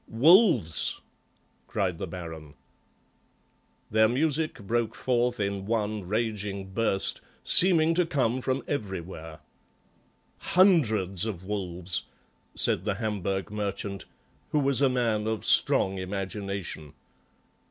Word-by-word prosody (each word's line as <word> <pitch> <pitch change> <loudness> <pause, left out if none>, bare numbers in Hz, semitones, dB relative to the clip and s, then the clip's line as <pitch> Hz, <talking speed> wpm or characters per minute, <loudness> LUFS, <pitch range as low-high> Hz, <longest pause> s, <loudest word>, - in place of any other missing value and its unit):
"Wolves!" 150 - +4 0.7
cried 95 -5 -2
the - - -4
Baron. 80 -4 -9 1.4
Their 110 +1 +4
music 155 +5 0
broke 115 +2 -1
forth 125 -1 0
in 100 -1 -3
one 105 -3 -2
raging 105 -2 -3
burst, 95 -1 0 0.2
seeming 165 -3 +5
to 175 0 +1
come 130 -5 0
from 130 +1 -2
everywhere. 85 - -6 1.0
"Hundreds 110 - +3
of 95 -4 -6
wolves," 90 -3 -3 0.5
said 85 - +2
the 105 -1 -1
Hamburg 100 -2 -3
merchant, 100 -1 -4 0.4
who 150 - +1
was 140 -1 0
a 135 - +4
man 115 -4 0
of 110 -1 -3
strong 95 0 +4
imagination. 95 -4 -5
105 Hz, 105 wpm, -27 LUFS, 95-125 Hz, 1.4 s, seeming